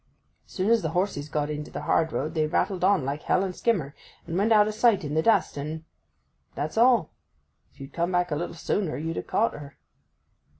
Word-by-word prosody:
As - - -17
soon 195 +4 0
as 230 -1 +4
the 160 - -2
horses 165 -6 -1
got 150 0 -1
into 150 0 -5
the - - -6
hard 160 -1 +1
road 155 +3 -2
they 155 -2 +1
rattled 180 +3 -1
on 190 -7 +3
like 140 +2 -3
hell 185 - +1
and 185 -2 -4
skimmer, 170 - 0 0.3
and 170 - -5
went 205 +5 +1
out 210 -1 +6
of 215 - -2
sight 220 -3 +3
in 145 -1 -4
the 160 - +2
dust, 225 -6 +2
and—that's 150 - -8
all. 235 -6 +4 0.6
If - - -27
you'd 135 +1 -10
come 170 +1 -1
back 180 -1 0
a - - +1
little 170 +2 -4
sooner 170 0 -2
you'd 165 +3 -4
ha' - - -30
caught 230 - +1
her. 145 -1 -10
165 Hz, 215 wpm, -26 LUFS, 150-200 Hz, 0.6 s, out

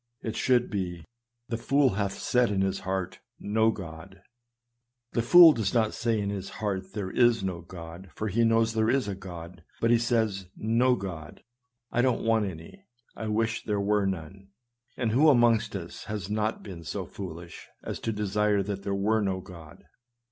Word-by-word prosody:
It 110 - -3
should 125 -1 +2
be, 90 -5 -3 0.2
" 120 0 -54
The 115 -1 -2
fool 140 +2 +3
hath 100 0 -1
said 125 -1 +2
in 100 -2 0
his 95 0 0
heart, 95 -1 -3 0.2
no 110 +2 +2
GodP 95 0 -9 0.9
The 115 - 0
fool 165 +6 +9
does 110 -2 -2
not 110 -2 +2
say 115 -2 0
in 100 -1 -2
his 100 -1 -5
heart 95 -3 -3
there 95 -3 -4
is 120 -3 +3
no 90 -3 -3
God, 85 +1 -10
for 110 - -3
he 110 +4 +1
knows 115 0 +3
there 110 0 +1
is 130 -3 +1
a 100 - -2
God; 90 -3 -9 0.2
but 115 - +2
he 120 - +5
says, 110 -5 0
"No 120 +3 +2
God 85 -7 -7 0.2
— 120 -1 -56
I 120 - +2
don't 125 -2 +1
want 110 -2 +3
any; 95 - -10 0.3
I 110 - -5
wish 110 +1 0
there 105 -1 -1
were 100 0 +1
none." 95 +1 -6 0.5
And 115 -3 0
who 145 +7 +5
amongst 120 -6 +3
us 85 -3 -7
has 105 -1 -5
not 110 +1 -1
been 90 -5 -9
so - - -4
foolish 85 -3 -9 0.2
as - - -5
to 115 - -2
desire 105 -1 +1
that 100 0 -4
there 100 0 -2
were 110 +3 +1
no 95 -2 -1
God? 85 -5 -13
105 Hz, 190 wpm, -28 LUFS, 95-115 Hz, 0.9 s, fool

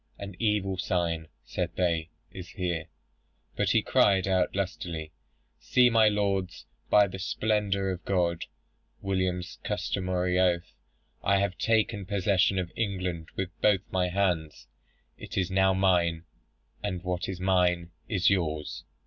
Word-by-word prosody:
'An 100 -2 -7
evil 105 -4 0
sign,' 85 -3 -1 0.2
said - - -4
they, 85 -3 0 0.2
'is 90 -2 -8
here.' 85 -4 -2 0.7
But - - +1
he - - +3
cried 95 -2 +3
out 95 -1 +1
lustily, 85 -5 -3 0.5
'See, 120 +11 +4
my 110 -1 +6
lords! 100 -3 -1 0.2
by 105 -1 +6
the 95 0 -7
splendour 100 -1 0
of 90 -1 -6
God, 85 -3 0 0.6
[William's 95 -2 -2
customary 90 -2 -1
oath.] 90 -1 +1 0.5
I 100 0 +3
have 100 -2 0
taken 110 -3 +1
possession 100 -1 +2
of 90 -2 -2
England 90 -6 -2
with 95 -1 -2
both 105 -3 +4
my 90 -1 +1
hands. 85 -8 -1 0.5
It - - -8
is 95 -1 0
now 95 0 +4
mine; 85 -3 +2 0.6
and 90 -4 -3
what 90 0 -2
is 95 -2 -5
mine 90 -2 +2 0.2
is 95 -4 +1
yours.' 80 -6 0
95 Hz, 135 wpm, -28 LUFS, 90-100 Hz, 0.7 s, my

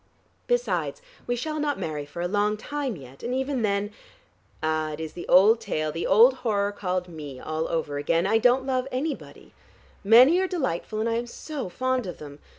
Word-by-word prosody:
Besides, - - 0 0.3
we 245 - 0
shall 305 +5 -3
not 295 -1 0
marry 150 -2 -4
for 170 +4 -5
a - - 0
long 205 +2 +1
time 280 +1 -3
yet, 135 -3 -13
and 245 +2 -2
even 265 -1 -1
then 205 -1 0 0.7
Ah, 155 -1 0
it 150 - -7
is 160 -1 -5
the 175 - -8
old 210 +5 +6
tale, 155 -8 -2
the 165 +2 -3
old 240 +6 +6
horror 205 -5 0
called 185 -3 -2
Me 150 -6 -8
all 155 +3 -3
over 150 -3 -2
again 165 +4 +1
I 220 +3 +3
don't 250 +3 +3
love 260 -1 0
anybody. 280 +4 -5 0.5
Many 250 - +7
are 380 - +1
delightful 220 - -2
and 225 - 0
I 230 0 0
am 240 +1 -3
so 275 -2 -6
fond 255 +2 -1
of 180 - -6
them. 145 -1 -10
210 Hz, 195 wpm, -26 LUFS, 165-255 Hz, 0.7 s, Many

